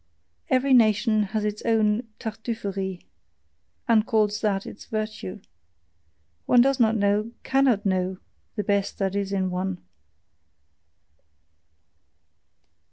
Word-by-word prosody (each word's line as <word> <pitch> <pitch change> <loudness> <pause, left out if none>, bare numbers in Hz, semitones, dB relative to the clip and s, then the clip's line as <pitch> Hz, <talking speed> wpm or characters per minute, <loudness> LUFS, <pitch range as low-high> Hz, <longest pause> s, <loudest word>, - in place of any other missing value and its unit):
Every 260 +1 +3
nation 215 -2 +4
has 210 +1 -2
its 210 0 -3
own 225 0 +1
"Tartuffery," 200 -4 -4 0.8
and 225 -3 +4
calls 215 -3 +1
that 200 -3 0
its - - -10
virtue. 215 - -5 1.1
One 245 - +5
does 270 +1 +2
not 225 -1 +4
know 205 +2 +1
cannot 260 -6 +2
know, 185 -1 0 0.4
the 210 - -2
best 200 -1 0
that 195 -1 -1
is 200 -1 -2
in 190 -2 0
one. 185 0 -3
210 Hz, 105 wpm, -25 LUFS, 195-225 Hz, 1.1 s, One